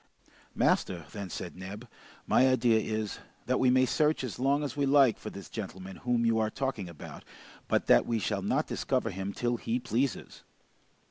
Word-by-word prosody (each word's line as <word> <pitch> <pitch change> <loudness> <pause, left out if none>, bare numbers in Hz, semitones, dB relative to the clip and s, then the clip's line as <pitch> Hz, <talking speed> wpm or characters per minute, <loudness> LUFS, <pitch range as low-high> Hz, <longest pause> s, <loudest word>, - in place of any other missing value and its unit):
"Master," 85 -4 +1
then 100 -1 -6
said - - -6
Neb, 100 +6 -8 0.4
"my 130 - +4
idea 120 -3 +3
is, 110 -1 -3 0.3
that 130 +1 +1
we 130 - +4
may 130 +1 +5
search 150 +2 +1
as 120 -2 -5
long 140 +3 +2
as 140 -3 -4
we 140 -1 +1
like 135 -4 +5
for - - -6
this 100 - -9
gentleman 95 -3 -7
whom 120 -1 0
you 115 -1 +3
are 110 -1 +1
talking 130 -8 -3
about, 85 - -10 0.4
but - - +1
that - - +5
we 115 - +1
shall 105 - -1
not - - 0
discover - - -1
him 95 +2 -4
till 120 +3 -1
he 115 +1 -1
pleases." 125 +2 -2
115 Hz, 185 wpm, -30 LUFS, 100-130 Hz, 0.4 s, may